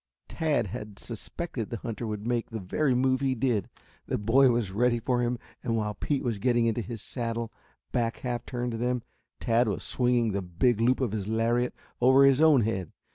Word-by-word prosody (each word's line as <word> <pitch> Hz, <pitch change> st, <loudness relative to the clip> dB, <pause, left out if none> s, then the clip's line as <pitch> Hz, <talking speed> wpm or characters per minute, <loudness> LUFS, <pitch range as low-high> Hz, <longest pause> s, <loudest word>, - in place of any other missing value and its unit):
Tad 155 Hz, -7 st, 0 dB
had 105 Hz, +1 st, -7 dB
suspected 115 Hz, -, -5 dB
the 120 Hz, -, -3 dB
hunter 115 Hz, +1 st, -5 dB
would 105 Hz, -1 st, -4 dB
make 120 Hz, -1 st, -1 dB
the 115 Hz, -, -5 dB
very 125 Hz, +8 st, 0 dB
move 130 Hz, +1 st, +2 dB
he 135 Hz, -1 st, +1 dB
did. 115 Hz, -5 st, 0 dB, 0.4 s
The -, -, 0 dB
boy 125 Hz, +6 st, +4 dB
was 115 Hz, -5 st, 0 dB
ready 120 Hz, +4 st, +2 dB
for 125 Hz, +1 st, 0 dB
him 120 Hz, 0 st, 0 dB, 0.3 s
and 115 Hz, -2 st, 0 dB
while 105 Hz, -1 st, -1 dB
Pete 140 Hz, +8 st, -2 dB
was 115 Hz, -5 st, -1 dB
getting 120 Hz, 0 st, +2 dB
into 115 Hz, +1 st, +1 dB
his 115 Hz, +1 st, -7 dB
saddle, 115 Hz, -2 st, -3 dB, 0.4 s
back 115 Hz, -2 st, 0 dB
half 125 Hz, -2 st, -3 dB
turned 120 Hz, -1 st, -3 dB
to 115 Hz, -, -4 dB
them, 125 Hz, 0 st, 0 dB, 0.4 s
Tad 115 Hz, +1 st, +2 dB
was 100 Hz, -, -2 dB
swinging 120 Hz, -3 st, +1 dB
the 100 Hz, 0 st, -1 dB
big 105 Hz, +6 st, +1 dB
loop 125 Hz, +3 st, +3 dB
of 125 Hz, -6 st, 0 dB
his 105 Hz, -2 st, -3 dB
lariat 115 Hz, +3 st, +1 dB, 0.3 s
over 130 Hz, +2 st, +6 dB
his 135 Hz, +1 st, +5 dB
own 155 Hz, -5 st, +6 dB
head. 100 Hz, -6 st, -2 dB
120 Hz, 200 wpm, -28 LUFS, 110-125 Hz, 0.4 s, over